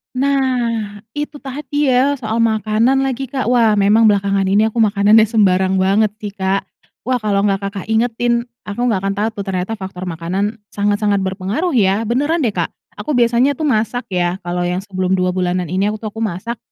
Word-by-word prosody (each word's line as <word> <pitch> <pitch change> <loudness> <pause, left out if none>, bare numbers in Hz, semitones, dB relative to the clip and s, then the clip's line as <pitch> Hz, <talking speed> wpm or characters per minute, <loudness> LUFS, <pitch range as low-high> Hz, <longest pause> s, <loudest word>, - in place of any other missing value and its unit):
Nah, 245 -6 0
itu 295 +2 -5
tadi 285 +1 -2
ya 265 +3 +3
soal 225 -3 -3
makanan 225 +4 +2
lagi, 270 0 -2
Kak. 260 -1 -2
Wah, 230 -4 +4
memang 210 +2 +4
belakangan 200 -1 +2
ini 210 +3 +3
aku 235 - -3
makanannya 215 0 +5
sembarang 190 -4 +2
banget 200 +3 +2
sih, 205 -1 -5
Kak. 195 -1 -1 0.4
Wah, 250 +1 0
kalau 205 -2 0
enggak 195 -1 0
Kakak 200 0 -7
ingetin, 235 +1 +1 0.2
aku 240 +4 -1
enggak 210 -5 +1
akan 195 0 0
tahu 210 +2 0
tuh 200 - -2
ternyata 185 +3 -2
faktor 190 -1 -7
makanan 185 +6 -3
sangat-sangat 205 0 +1
berpengaruh, 195 - -2
ya. 200 -1 +2
Beneran 290 +8 +1
deh, 230 - +1
Kak. - - -1 0.3
Aku 300 - -3
biasanya 245 +2 +3
tuh 300 - -6
masak 240 -1 -1
ya. 180 0 -1
Kalau 175 0 -2
yang 180 +2 -1
sebelum 185 -1 -2
2 185 -1 +1
bulanan 180 -1 -1
ini 190 +3 0
aku, 215 - -7
tuh 215 - -4
aku 225 - -9
masak. 215 +4 -3
215 Hz, 185 wpm, -18 LUFS, 195-240 Hz, 0.4 s, makanannya